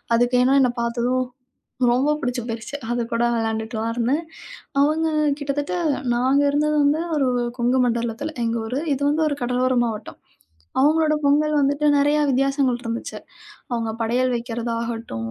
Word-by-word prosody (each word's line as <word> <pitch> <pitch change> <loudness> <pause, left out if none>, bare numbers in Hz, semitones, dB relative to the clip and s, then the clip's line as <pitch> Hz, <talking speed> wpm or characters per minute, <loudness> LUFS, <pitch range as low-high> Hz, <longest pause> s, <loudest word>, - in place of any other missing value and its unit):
அதுக்கு 245 +2 +2
என்ன 270 +2 +4
என்ன 250 -2 +3
பாத்ததும் 240 +2 0 0.7
ரொம்ப 265 +5 +2
புடிச்சு 245 -1 -2
போயிருச்சு. 230 +4 -5
அது 240 0 0
கூட 230 - 0
விளையாண்டுட்டுலாம் 225 0 -2
இருந்தேன். 255 +7 0 0.6
அவங்க 310 +3 +2 0.3
கிட்டத்தட்ட 285 +3 -2 0.4
நாங்க 260 +4 +2
இருந்தது 300 +1 +1
வந்து 290 +3 +2 0.2
ஒரு 270 - +2 0.3
கொங்கு 245 +2 +2
மண்டலத்துல 235 +5 -2
எங்க 230 +1 0
ஊரு. 260 +5 -2
இது 275 - -4
வந்து 315 +2 +1
ஒரு 285 - -3
கடலோர 250 +1 +1
மாவட்டம். 220 -2 -6 0.6
அவங்களோட 305 +2 +3
பொங்கல் 300 +2 +3
வந்துட்டு 285 +2 +1
நெறையா 290 +1 +3
வித்தியாசங்கள் 270 -1 +1
இருந்துச்சு. 230 0 -4 0.6
அவங்க 230 -2 -1
படையல் 245 +3 +1
வைக்கிறதாகட்டும், 230 - -4
250 Hz, 135 wpm, -22 LUFS, 235-285 Hz, 0.7 s, என்ன